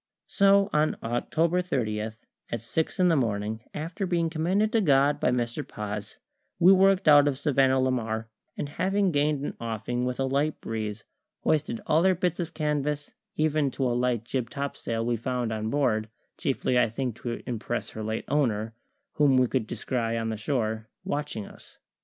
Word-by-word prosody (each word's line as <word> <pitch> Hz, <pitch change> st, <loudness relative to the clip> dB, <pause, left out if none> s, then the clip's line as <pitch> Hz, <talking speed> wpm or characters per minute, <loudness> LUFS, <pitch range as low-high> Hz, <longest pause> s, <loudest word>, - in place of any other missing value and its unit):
So 200 Hz, 0 st, +4 dB
on 150 Hz, +1 st, +2 dB
October 160 Hz, +9 st, +1 dB
30, 110 Hz, -11 st, -1 dB
at 110 Hz, 0 st, -5 dB, 0.4 s
six 155 Hz, -, -2 dB
in 180 Hz, -, +5 dB
the 165 Hz, -, +4 dB
morning, 110 Hz, -4 st, -1 dB
after 165 Hz, +6 st, -4 dB
being 170 Hz, -2 st, 0 dB
commended 185 Hz, +7 st, +1 dB
to 225 Hz, -2 st, +3 dB
God 145 Hz, -3 st, +3 dB
by -, -, +2 dB
Mr. 120 Hz, -1 st, -1 dB
Paz, 105 Hz, 0 st, -6 dB, 0.4 s
we 180 Hz, +2 st, +7 dB
worked 195 Hz, -1 st, +4 dB
out 145 Hz, -1 st, +8 dB
of 140 Hz, -2 st, 0 dB
Savannah 135 Hz, -2 st, +3 dB
la 130 Hz, 0 st, +2 dB
Mar, 110 Hz, -2 st, -2 dB, 0.3 s
and, -, -, -2 dB
having 190 Hz, +5 st, +1 dB
gained 145 Hz, -1 st, +1 dB
an -, -, -4 dB
offing 115 Hz, +2 st, -3 dB
with 125 Hz, 0 st, -2 dB
a 135 Hz, -, +2 dB
light 140 Hz, +3 st, 0 dB
breeze, 110 Hz, -2 st, -4 dB, 0.4 s
hoisted 155 Hz, +10 st, 0 dB
all 160 Hz, -5 st, +3 dB
her 190 Hz, +1 st, +4 dB
bits 180 Hz, -1 st, -1 dB
of 170 Hz, -1 st, -4 dB
canvas, 150 Hz, -1 st, -1 dB, 0.2 s
even 155 Hz, -2 st, +2 dB
to 135 Hz, 0 st, -2 dB
a 125 Hz, -, +1 dB
light 120 Hz, -2 st, 0 dB
jib 120 Hz, -1 st, -2 dB
topsail 125 Hz, -5 st, -3 dB
we 120 Hz, 0 st, 0 dB
found 125 Hz, 0 st, -2 dB
on 110 Hz, 0 st, -2 dB
board 110 Hz, -6 st, +1 dB, 0.3 s
chiefly, 125 Hz, -, 0 dB
I 120 Hz, -, +3 dB
think, 120 Hz, 0 st, -3 dB
to 120 Hz, -1 st, -5 dB
impress 120 Hz, -1 st, -3 dB
her 110 Hz, -, -6 dB
late 110 Hz, +1 st, -3 dB
owner, 115 Hz, -6 st, 0 dB, 0.4 s
whom 145 Hz, -3 st, +5 dB
we 130 Hz, -, +5 dB
could 125 Hz, -2 st, -1 dB
descry 115 Hz, -2 st, -2 dB
on 115 Hz, 0 st, -2 dB
the 110 Hz, -, -2 dB
shore, 110 Hz, -2 st, -2 dB
watching 145 Hz, -8 st, -3 dB
us. -, -, -15 dB
130 Hz, 180 wpm, -27 LUFS, 115-155 Hz, 0.4 s, out